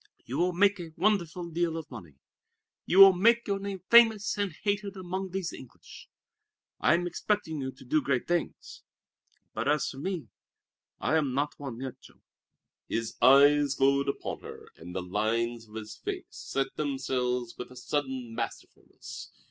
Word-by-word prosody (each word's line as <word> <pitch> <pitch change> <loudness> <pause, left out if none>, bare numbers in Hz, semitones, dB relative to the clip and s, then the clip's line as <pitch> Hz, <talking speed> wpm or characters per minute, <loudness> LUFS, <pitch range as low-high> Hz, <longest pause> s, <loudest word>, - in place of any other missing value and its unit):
You 130 +5 -4
will 180 +1 +2
make 200 +3 +3
a 165 -2 -8
wonderful 175 -3 0
deal 165 0 0
of 160 -3 -8
money. 90 - -10 0.7
You 180 - +1
will 195 -1 +11
make 230 +6 +3
your 200 -1 0
name 195 -2 -6
famous 225 -3 +6
and 205 -2 -1
hated 205 -1 -1
among 190 +1 -4
these 185 -1 -3
English. 130 - -13 0.7
I - - +4
am 175 +1 -1
expecting 175 -3 -2
you 130 0 -3
to 130 - -16
do 155 +5 +2
great 135 -2 -1
things. 175 -1 -3 0.7
But - - -3
as 150 0 +2
for 135 - -6
me 180 +1 -4 0.7
I 160 - +1
am 140 -5 0
not 145 +2 -1
won 135 -5 -6
yet, 130 -1 -7
Jean." - - -19 0.6
His 115 -1 -3
eyes 140 +2 +6
glowed 140 +1 +2
upon - - -4
her, - - -11
and 90 +2 -11
the 95 - -2
lines 115 +4 -1
of 105 - -14
his 110 -1 -7
face - - -5
set 135 0 -3
themselves 125 -4 -2
with 125 - -7
a 125 - -14
sudden 130 -2 -3
masterfulness. - - -7
145 Hz, 165 wpm, -29 LUFS, 125-185 Hz, 0.7 s, will